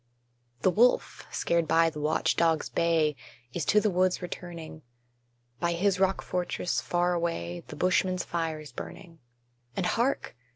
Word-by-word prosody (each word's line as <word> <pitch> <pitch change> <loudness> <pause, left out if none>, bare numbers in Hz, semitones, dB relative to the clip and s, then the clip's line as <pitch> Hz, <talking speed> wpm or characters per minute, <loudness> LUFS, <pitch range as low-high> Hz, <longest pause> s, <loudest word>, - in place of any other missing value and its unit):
The 185 - +4
wolf, 240 +6 +2
scared 170 -1 +1
by 165 0 +4
the 150 - -7
watch 150 +2 +1
dog's 165 -2 +2
bay, 160 -3 +2 0.4
Is 170 -4 -2
to 210 - +5
the 210 -1 +1
woods 185 0 +2
returning: 170 -3 -7 0.8
By 170 0 +1
his 185 +2 +1
rock 190 0 +2
fortress, 180 0 -1
far 175 0 +1
away, 130 - -2
The - - -8
Bushman's 185 0 +1
fire 165 -2 -2
is 150 -3 -10
burning. 165 +6 -9 0.6
And 190 - 0
hark! 240 - 0
170 Hz, 150 wpm, -28 LUFS, 160-185 Hz, 0.8 s, to